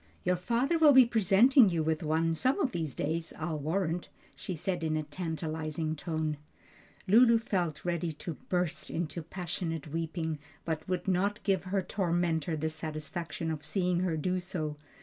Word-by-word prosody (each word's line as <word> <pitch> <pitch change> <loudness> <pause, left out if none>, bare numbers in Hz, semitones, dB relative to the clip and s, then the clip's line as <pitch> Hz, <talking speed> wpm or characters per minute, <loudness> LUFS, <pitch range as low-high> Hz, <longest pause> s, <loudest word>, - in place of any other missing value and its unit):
"Your 180 0 +2
father 240 - +1
will 305 -3 +7
be 260 -1 +9
presenting 230 +2 +5
you 165 -3 0
with 160 0 0
one 160 +1 +1
some 255 - +1
of 275 -9 +1
these 160 - -3
days, 160 +3 -2
I'll 155 -1 -3
warrant," 170 +3 -1 0.3
she 185 - -5
said 175 +1 -2
in 155 -1 0
a 155 - -1
tantalizing 160 -1 -3
tone. 155 -2 -2 0.7
Lulu 230 +4 +7
felt 180 -9 -2
ready 170 -1 -1
to 160 +2 -6 0.2
burst 180 -2 -1
into 170 0 -3
passionate 165 -2 -4
weeping, 160 0 -3 0.3
but 160 +1 -3
would 185 +1 -2
not 195 +3 +1
give 195 -2 +1
her 190 +1 0
tormentor 170 -4 0
the 155 +1 -1
satisfaction 155 +1 -4
of 150 -2 -5
seeing 180 +3 +1
her 175 -3 0
do 185 +4 0
so. 160 -4 -3
170 Hz, 165 wpm, -30 LUFS, 155-185 Hz, 0.7 s, be